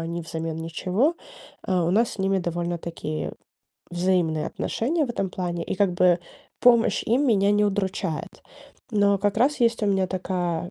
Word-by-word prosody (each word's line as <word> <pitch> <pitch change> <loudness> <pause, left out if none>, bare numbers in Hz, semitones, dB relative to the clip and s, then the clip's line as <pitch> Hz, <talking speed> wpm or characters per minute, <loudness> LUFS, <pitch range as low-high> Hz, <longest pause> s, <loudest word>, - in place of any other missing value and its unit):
они 170 +1 -4
взамен 160 0 -4
ничего. 180 - 0 0.5
А, 180 -2 0
у 170 - +1
нас 225 +5 +3
с - - -10
ними 195 0 +1
довольно-таки 170 -3 -3 0.6
взаимные 175 -3 +1
отношения 300 +7 -1
в 255 - -4
этом 195 -5 -2
плане, 175 -2 -3
и, - - -3
как 195 -1 +2
бы, 175 0 +4 0.4
помощь 235 -2 +4
им 255 +6 +2
меня 200 -4 +3
не 210 0 +3
удручает. 195 -4 -2 0.5
Но 205 -2 +3
как 205 +1 0
раз 270 +5 +2
есть 230 -1 +2
у - - +2
меня 195 -2 +2
такая 180 -2 -2
190 Hz, 165 wpm, -24 LUFS, 175-210 Hz, 0.6 s, бы